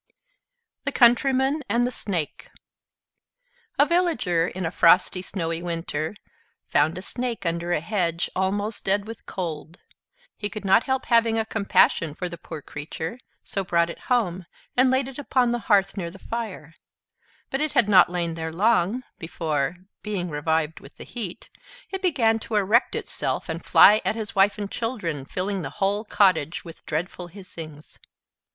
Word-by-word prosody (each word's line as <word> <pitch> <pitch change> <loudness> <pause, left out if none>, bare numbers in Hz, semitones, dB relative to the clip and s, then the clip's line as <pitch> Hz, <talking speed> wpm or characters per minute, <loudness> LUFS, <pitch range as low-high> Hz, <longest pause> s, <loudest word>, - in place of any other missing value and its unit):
THE 280 - -1
COUNTRYMAN 265 +4 +4
AND 235 +3 +2
THE 245 - 0
SNAKE 180 - -4 1.3
A 285 - +6
Villager, 305 - +1
in 185 0 -4
a 165 - -1
frosty, 180 +1 +4
snowy 165 -3 -3
winter, 165 0 -3 0.5
found 155 +4 +2
a 185 - -6
Snake 240 -3 -4
under 170 +1 -1
a 165 - +1
hedge, 170 -2 -1
almost 205 +3 -1
dead 200 +1 +1
with 225 0 -10
cold. 165 -2 -5 0.6
He 205 - -4
could 215 -2 -7
not 195 +4 +5
help 265 -1 -1
having 230 -1 +3
a 220 - +1
compassion 200 -7 +2
for 180 - -3
the 170 - -8
poor 155 -3 -8
creature, 160 - -6 0.2
so 195 - -3
brought 170 -2 +1
it - - -11
home, 190 -8 +1 0.3
and 255 +1 +5
laid 260 0 +1
it 270 +1 -8
upon 255 -3 +2
the 240 - 0
hearth, 195 -2 +4
near 175 -4 -3
the 185 - -12
fire; 205 -8 -6 0.8
but 270 - -1
it 305 -1 -1
had 215 - +4
not 190 -4 +7
lain 175 -2 -2
there 160 0 -4
long, 215 +5 +2 0.2
before 160 -3 -2 0.3
(being 190 -5 -3
revived 160 +1 0
with - - -15
the - - -9
heat) 220 -5 -6 0.4
it 385 -1 -4
began 240 -11 +2
to 220 - -5
erect 210 +4 +3
itself, - - -3
and - - -4
fly 215 +1 +7
at 190 +3 0
his 220 -2 -4
wife 195 +2 +4
and 205 -1 -5
children, 180 - -3
filling 190 +5 -3
the - - -4
whole 200 +2 +1
cottage 180 -8 +2
with 165 -1 -11
dreadful 175 +3 -3
hissings. 165 -5 -10
195 Hz, 165 wpm, -25 LUFS, 170-230 Hz, 1.3 s, not